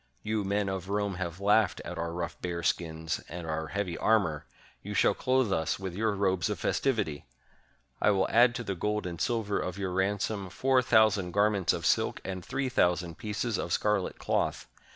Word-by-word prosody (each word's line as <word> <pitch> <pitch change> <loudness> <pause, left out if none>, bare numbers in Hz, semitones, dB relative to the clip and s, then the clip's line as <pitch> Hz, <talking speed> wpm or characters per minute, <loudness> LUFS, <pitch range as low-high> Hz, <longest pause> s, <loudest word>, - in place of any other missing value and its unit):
You 105 0 -1
men 100 +1 0
of 95 -1 -4
Rome 100 -1 0
have 85 -1 -4
laughed 105 0 +3
at 90 -1 -6
our 85 0 -2
rough 85 0 -5
bear 85 -1 -3
skins 80 -1 -1
and 85 +2 -6
our 80 0 -3
heavy 95 -2 -2
armor; 85 -9 +2 0.3
you - - -6
shall - - +4
clothe 130 -5 +1
us 80 -2 0
with 95 -2 -5
your 110 +3 0
robes 95 -1 +1
of 105 - -2
festivity! 80 - -1 0.7
I - - +4
will 95 -2 +2
add 120 +1 +5
to 120 - -3
the 100 - -2
gold 105 +3 -2
and 85 -2 -5
silver 110 -4 0
of 90 +1 -4
your 95 -2 -2
ransom, 100 +1 -1
four 130 +5 +2
thousand 110 -6 +3
garments 100 -3 +3
of - - -3
silk - - +2
and 95 -1 -4
three 135 +8 -2
thousand 90 -8 +1
pieces 110 0 -2
of - - -3
scarlet 105 -3 0
cloth. - - -1
95 Hz, 190 wpm, -29 LUFS, 85-105 Hz, 0.7 s, add